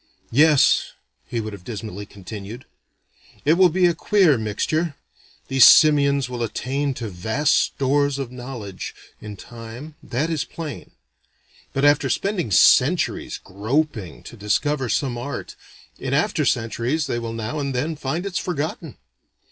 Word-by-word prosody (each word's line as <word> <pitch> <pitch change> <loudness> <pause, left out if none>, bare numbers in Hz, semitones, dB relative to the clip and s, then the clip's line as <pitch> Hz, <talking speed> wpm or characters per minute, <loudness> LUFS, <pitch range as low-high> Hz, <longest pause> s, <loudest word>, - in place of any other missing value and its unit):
"Yes," 150 +2 +4 0.3
he 120 - -3
would 110 -1 -5
have 100 -3 -10
dismally 105 -2 -7
continued, 100 +5 -9 0.8
"it 150 - +5
will 180 +1 +5
be 180 +2 +2
a 175 - +4
queer 185 -5 +3
mixture: 140 +9 -1 0.5
these 135 -2 +5
simians 140 -3 +6
will 125 -1 -5
attain 135 +5 -2
to 115 - -5
vast 110 +10 0
stores 140 +1 +1
of 135 -3 -5
knowledge, 120 -6 -7 0.3
in 105 -2 -8
time, 120 +8 -10
that 145 +7 -2
is 155 -4 0
plain. 160 -4 -8 0.8
But 135 +1 0
after 145 -2 +4
spending 185 - -1
centuries 95 - +3
groping 110 - -3
to - - -11
discover 130 +6 -1
some 125 -2 -1
art, 140 +4 -6 0.4
in - - -2
after - - +1
centuries 120 +7 0
they 120 -3 -2
will 115 -1 -5
now 115 +6 -4
and 140 -2 -3
then 155 +6 -1
find 155 +5 -3
it's 190 -3 -2
forgotten. 160 -2 -4
135 Hz, 140 wpm, -22 LUFS, 115-150 Hz, 0.8 s, simians